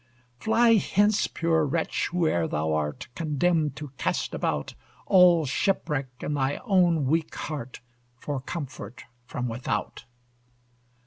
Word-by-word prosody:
Fly 225 - +4
hence, 205 +1 +2
poor 165 -1 +1
wretch, 160 +3 -1
whoe'er 160 - +1
thou 80 +1 -1
art, 75 -1 -2
Condemned 155 -1 0
to 150 -1 -7
cast - - -1
about, - - -2 0.3
All 180 -4 +6
shipwreck 145 -2 0
in 150 - -2
thy 140 -1 0
own 175 - +3
weak 160 +4 0
heart, 140 -5 -6 0.4
For 140 +2 -4
comfort 130 - -7 0.2
from 125 0 -3
without! 115 -2 -3
150 Hz, 120 wpm, -26 LUFS, 130-175 Hz, 0.4 s, All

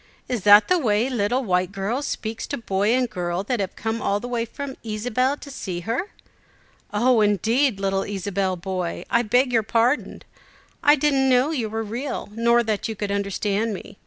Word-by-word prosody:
"Is 245 -4 -2
that 205 +1 +8
the 365 -1 +3
way 230 -1 +1
little 245 +3 0
white 180 -3 0
girl 205 +7 -2
speaks 225 -5 -4
to - - -3
boy 200 -2 0
and 255 -1 +1
girl 180 -3 -3
that 240 +3 -2
have 195 -1 -3
come 225 +1 -3
all 200 +1 0
the 245 - -6
way 240 -1 -1
from 270 +3 -7
Ysabel 245 +5 -1
to 280 - -10
see 185 -9 -5
her?" 235 - -2 0.8
"Oh, 235 +2 +3
indeed! 220 - +2
little 195 0 0
Ysabel 195 -1 -2
boy, 185 -1 -4
I 235 - +4
beg 245 +3 +2
your 225 - +4
pardon. 230 +5 0 0.6
I 290 - +6
didn't 275 -2 +2
know 255 +4 +3
you 240 -8 -2
were 225 +1 -3
real, 240 +5 -4
nor 235 +2 +3
that 215 -3 -1
you 220 - -4
could 205 -1 -3
understand 200 +2 -1
me! 195 - -11
225 Hz, 190 wpm, -23 LUFS, 200-250 Hz, 0.8 s, that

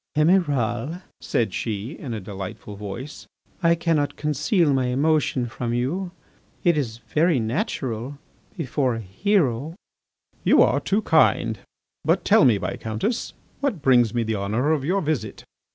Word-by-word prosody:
"Emiral," 150 - +1 0.2
said 115 - -1
she, 110 +2 -3
in 145 -5 -7
a 110 - -3
delightful 100 +1 -7
voice, 105 +8 -7 0.3
"I 170 -1 +4
cannot 155 -4 0
conceal 150 - +1
my 130 -2 +1
emotion 140 -1 +1
from 120 0 -3
you.... 165 +10 -1 0.5
It 170 -1 +4
is 120 -7 -2
very 155 +4 +1
natural... 120 +3 -3 0.4
before 135 -5 0
a - - -4
hero." 145 - 0 0.7
"You - - +6
are - - +2
too 210 +3 0
kind. 160 -4 +3 0.4
But - - +1
tell - - +6
me, 115 -5 +5
Viscountess, 110 - -3 0.3
what 250 - -2
brings 120 -5 +5
me 120 0 0
the 110 -1 -1
honour 110 +9 0
of 150 -4 +1
your 185 +7 +1
visit." 145 - -3
135 Hz, 140 wpm, -23 LUFS, 115-160 Hz, 0.7 s, You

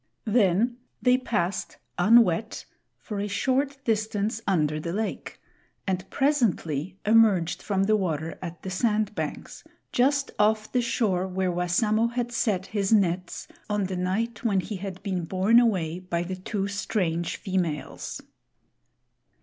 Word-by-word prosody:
Then 220 +1 +2 0.2
they 250 0 +4
passed, 210 -8 -2 0.2
unwet, 220 +1 +4 0.3
for 210 -3 -6
a 205 - -1
short 265 +7 0
distance 215 -1 0
under 155 -5 +1
the 170 +2 -4
lake 215 +2 -4 0.5
and 185 -1 -2
presently 195 - 0
emerged 210 -6 +4
from 195 -2 0
the 215 +2 +3
water 165 -5 -2
at 175 -2 -7
the 190 - -4
sand 215 +1 +1
banks, - - -5 0.3
just 275 +2 +2
off 215 +1 +2
the 250 - +2
shore 210 -6 0
where 185 0 -1
Wassamo 210 +6 +1
had 240 -1 -2
set 210 -6 0
his 200 -1 0
nets 180 -4 +1 0.2
on 205 -1 0
the 190 0 -3
night 210 +6 -2
when 200 -5 +2
he 205 +2 -5
had 190 -1 -7
been 185 -4 -2
borne 190 +7 +4
away 180 -8 +1
by 175 -2 -2
the 185 +2 -4
two 195 +2 -3
strange 185 -5 -1
females. 180 -6 -3
200 Hz, 140 wpm, -26 LUFS, 180-225 Hz, 0.5 s, they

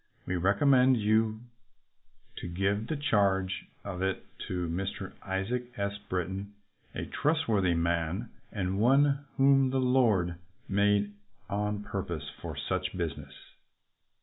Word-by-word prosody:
We 90 - -1
recommend 125 +8 +4
you 110 +1 +2 1.0
to - - -5
give 95 +5 0
the 155 - -1
charge 100 -9 +1 0.2
of 95 -2 -5
it 95 -1 -1 0.2
to 90 -2 -2
Mr. 95 +3 -4
Isaac 120 +6 -3
S. 100 0 -1 0.2
Britton, 95 +3 -3 0.4
a - - -3
trustworthy 110 - +1
man 85 +6 0 0.2
and 95 -1 -1
one 140 +4 +4
whom 135 -1 +5
the 135 - 0
Lord 110 -10 +3 0.3
made 100 +1 +2 0.4
on 105 0 -1
purpose 85 -8 -4
for - - -6
such - - -2
business." - - -4
100 Hz, 120 wpm, -30 LUFS, 95-125 Hz, 1.0 s, whom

